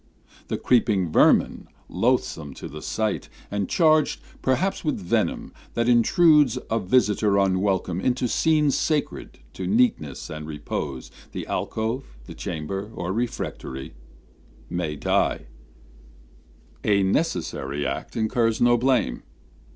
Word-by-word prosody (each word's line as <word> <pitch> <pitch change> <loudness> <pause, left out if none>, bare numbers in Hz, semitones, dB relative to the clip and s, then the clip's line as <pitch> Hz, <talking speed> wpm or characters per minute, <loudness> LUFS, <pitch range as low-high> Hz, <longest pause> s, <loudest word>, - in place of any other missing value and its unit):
The - - -2
creeping 105 -8 +2
vermin, - - +3 0.2
loathsome 75 -4 -1
to - - -7
the 75 +1 -9
sight, 110 +4 -2 0.2
And 100 -2 -2
charged 155 -2 +3 0.2
perhaps 180 +10 0
with 155 - -1
venom, 90 -3 -1 0.2
that 115 0 +1
intrudes, 135 +2 +5
A 115 - +2
visitor 105 -1 +2
unwelcome, 95 -2 +1
into 125 +1 +1
scenes 150 +2 +2
Sacred 155 -3 -2 0.2
to 95 - -5
neatness 105 - +1
and 75 0 -7
repose, 75 -3 -5 0.2
the - - -4
alcove, 110 - -3
The - - -9
chamber, 95 +5 -5
or 90 +1 -3
refectory, 100 - -4 0.8
may 85 -4 -2
die: - - 0 1.4
A 100 -2 +3
necessary 85 - -1
act 65 - -4
incurs 115 0 +1
no 120 0 +5
blame. 130 +1 +1
105 Hz, 115 wpm, -24 LUFS, 85-125 Hz, 1.4 s, intrudes